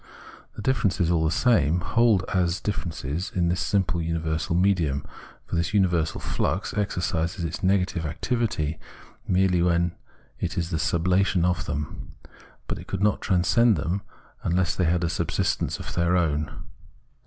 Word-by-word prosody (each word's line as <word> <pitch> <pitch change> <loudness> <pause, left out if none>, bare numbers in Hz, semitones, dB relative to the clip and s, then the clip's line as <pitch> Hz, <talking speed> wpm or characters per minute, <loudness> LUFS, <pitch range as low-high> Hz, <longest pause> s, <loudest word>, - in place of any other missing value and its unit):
The 105 - -7
differences 100 -8 +1
aU 80 -2 +2
the - - +3
same 85 - +3
hold 110 -1 +3
as 90 -2 +1
differences 85 -4 -3
in 85 -2 +2
this 85 -1 0
simple 90 -3 0
universal 80 0 -1
medium; 85 -7 +1 0.4
for - - -4
this 85 +6 -1
universal 85 -5 +2
flux 95 +4 -2
exercises 85 -4 -1
its 80 +4 -4
negative 95 -2 +1
activity 85 - -1 0.5
merely 90 -1 +3
when 85 0 +2 0.5
it - - -3
is 85 0 -1
the 80 - 0
sublation 90 +3 +2
of 90 -3 0
them; 75 -1 -5 0.5
but - - -4
it - - -11
could 95 +1 -2
not 105 - +2
transcend 105 +5 +3
them 85 +7 -1 0.4
unless 90 +1 +1
they 90 - +1
had 85 +1 +1
a - - +2
subsistence 85 0 -1
of - - -6
their 85 +1 +2
own. 75 -3 0
85 Hz, 150 wpm, -25 LUFS, 80-95 Hz, 0.5 s, the